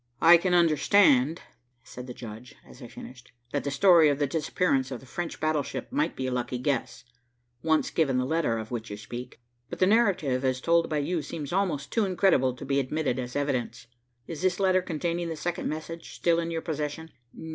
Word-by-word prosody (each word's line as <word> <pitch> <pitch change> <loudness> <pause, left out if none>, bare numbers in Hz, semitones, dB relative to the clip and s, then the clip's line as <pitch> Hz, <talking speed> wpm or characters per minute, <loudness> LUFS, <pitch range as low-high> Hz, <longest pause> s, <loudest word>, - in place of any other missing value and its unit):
"I 170 +1 +8
can 180 +1 +1
understand," 160 -3 +4 0.4
said 125 +1 -10
the 125 - -6
judge, 115 +1 -10
as - - -15
I 120 - -8
finished, 125 +1 -12 0.2
"that 145 - -1
the 140 - -2
story 165 +1 +5
of 140 - +1
the 145 - +1
disappearance 140 -2 0
of 130 -3 -5
the - - -16
French 170 +6 -5
battleship 150 -4 -2
might 150 +3 0
be 130 - -3
a 130 - -2
lucky 125 0 -2
guess, 125 -2 -2 0.6
once 160 -1 +1
given 140 -6 +1
the 125 - +1
letter 150 -5 0
of 110 +1 -7
which 115 -2 -4
you 105 - -6
speak, 120 +3 -8 0.3
but - - -6
the 185 - +3
narrative 185 - +2
as 130 -1 0
told 170 +4 +2
by 155 - -1
you 160 +3 -1
seems 150 0 -6
almost 175 -7 -1
too 225 -3 +2
incredible 180 -9 +2
to - - -9
be 140 +1 +1
admitted 135 -1 -1
as 125 -1 -5
evidence. 125 -4 -2 0.4
Is 165 -2 -7
this 185 0 +1
letter 185 -1 +3
containing 170 0 -3
the 165 - -3
second 170 +3 -3
message 160 +2 -7
still 170 -1 +2
in 170 0 -2
your 165 -1 -3
possession?" 155 0 -4
150 Hz, 200 wpm, -27 LUFS, 130-170 Hz, 0.6 s, I